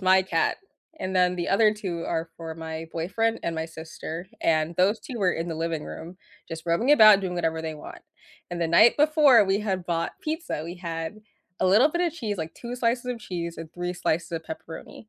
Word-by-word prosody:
my 190 0 +5
cat. 165 -3 0 0.4
And 185 0 -2
then, 180 0 +3
the 175 -1 -3
other 210 +2 +4
2 175 -5 -4
are 165 0 -2
for 165 -1 -7
my 160 0 -6
boyfriend 225 +7 -1
and 165 -1 -2
my 160 - -1
sister, 160 +2 -8
and 160 0 +1
those 195 +5 +3
2 245 -3 -7
were 185 -3 +2
in 165 +1 -3
the 160 - -4
living 165 -1 -2
room 175 +3 -8 0.3
just 165 0 -7
rubbing 200 +12 +3
about, 215 -7 +8
doing 180 -2 -3
whatever 165 -2 -1
they 160 -1 -4
want. 150 - -11 0.5
And 175 -1 -4
the 165 - 0
night 215 +8 +6
before, 295 -6 +6
we 195 +2 +1
had 190 -4 -2
bought 170 -1 -1
pizza, 315 - -3
we 175 +2 -7
had 165 +1 -5 0.4
a - - +2
little 215 +10 +6
bit 345 +2 0
of 340 - 0
cheese 215 - -4
like, 160 0 -5
2 245 +1 -7
slices 240 0 0
of 245 -2 -3
cheese 170 -5 -5
and 165 0 -8
3 175 0 -3
slices 170 -1 -1
of 165 -1 -4
pepperoni. 160 +7 -9
175 Hz, 215 wpm, -26 LUFS, 165-215 Hz, 0.5 s, about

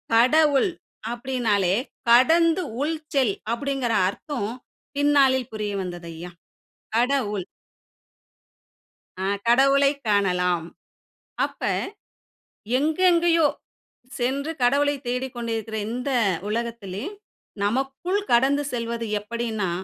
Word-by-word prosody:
கடவுள் 285 +6 +4 0.4
அப்டின்னாலே 235 -7 0 0.4
கடந்து 325 +8 +5 0.2
உள் 315 +3 0 0.2
செல் 250 -8 +2 0.2
அப்படிங்குற 270 -1 -2 0.2
அர்த்தம் 210 0 -4 0.5
பின்னாளில் 275 -3 +3
புரிய 210 -1 -3
வந்தது 175 -2 -6
ஐயா. 170 +2 -8 0.7
கடவுள் 230 -6 +1 1.7
ஆ - - -1 0.2
கடவுளைக் 275 +3 +4
காணலாம். 180 -4 +1 0.8
அப்ப - - -11 1.2
எங்க 305 +4 0
எங்கேயோ 335 -2 +4 0.7
சென்று 270 +5 -1
கடவுளைத் 280 +2 +2
தேடிக்கொண்டு 245 -1 -3
இருக்கிற 220 0 -5
இந்த 250 +4 -3 0.4
உலகத்திலே, 225 -2 -4 0.6
நமக்குள் 270 - -1
கடந்து 270 +4 +4
செல்வது 230 -1 -3
எப்படின்னா 220 -3 -3
245 Hz, 85 wpm, -24 LUFS, 215-280 Hz, 1.7 s, கடந்து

